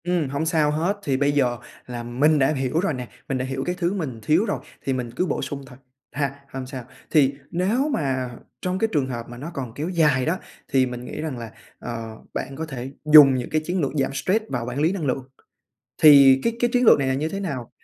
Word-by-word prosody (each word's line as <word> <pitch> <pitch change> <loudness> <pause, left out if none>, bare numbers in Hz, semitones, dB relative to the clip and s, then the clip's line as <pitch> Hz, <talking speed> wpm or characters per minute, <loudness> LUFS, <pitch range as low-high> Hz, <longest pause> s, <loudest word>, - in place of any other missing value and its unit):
Ừm, 175 -5 0
hổng 140 +3 -2
sao 160 -3 +2
hết. 170 +7 0
Thì 135 -6 0
bây 140 +1 +2
giờ 125 -4 +1 0.3
là 120 -1 -6
mình 145 +6 +2
đã 135 +3 +3
hiểu 135 +2 -1
rồi 185 -3 0
nè, 125 -2 -5 0.2
mình 135 - 0
đã 130 - -2
hiểu 135 0 -3
cái 180 - -1
thứ 175 +1 0
mình 145 - -4
thiếu 160 +8 +3
rồi, 205 - -2 0.3
thì 135 - +1
mình 125 -2 -3
cứ 180 - +1
bổ 165 - -2
sung 140 0 -5
thôi, 125 - -13 0.3
ha? 140 0 -2
Hông 130 -1 -6
sao. 130 -1 -7 0.3
Thì 140 -3 +4 0.2
nếu 215 - +1
mà 130 - -1 0.3
trong 185 0 -2
cái 225 - +2
trường 145 -4 +1
hợp 120 -3 -5
mà 120 - -9
nó 150 +7 -7
còn 130 -6 -5
kéo 150 +7 -4
dài 150 -8 +2
đó, 170 +4 0 0.3
thì 130 -1 +3
mình 125 -1 -6
nghĩ - - -6
rằng 155 -5 -4
là, 115 -2 -7 0.3
ờ, 115 -1 -6 0.2
bạn 135 - -4
có 160 +3 -4
thể 135 -3 -6
dùng 150 -3 +9
những 125 -1 -3
cái 155 - 0
chiến 180 +2 -1
lược 140 - 0
giảm 135 -2 0
stress 200 +10 0
và 125 - -2
quản 125 +3 -4
lý 160 +3 +3
năng 190 -6 -3
lượng. 135 0 -1 0.8
Thì 140 -3 +8
cái 230 0 0
cái 240 - +2
chiến 250 -1 +3
lược 220 - +7
này 135 -1 0
là 130 - +1
như 150 +4 -1
thế 195 +4 -4
nào? 140 -11 -4
140 Hz, 250 wpm, -23 LUFS, 130-165 Hz, 0.8 s, dùng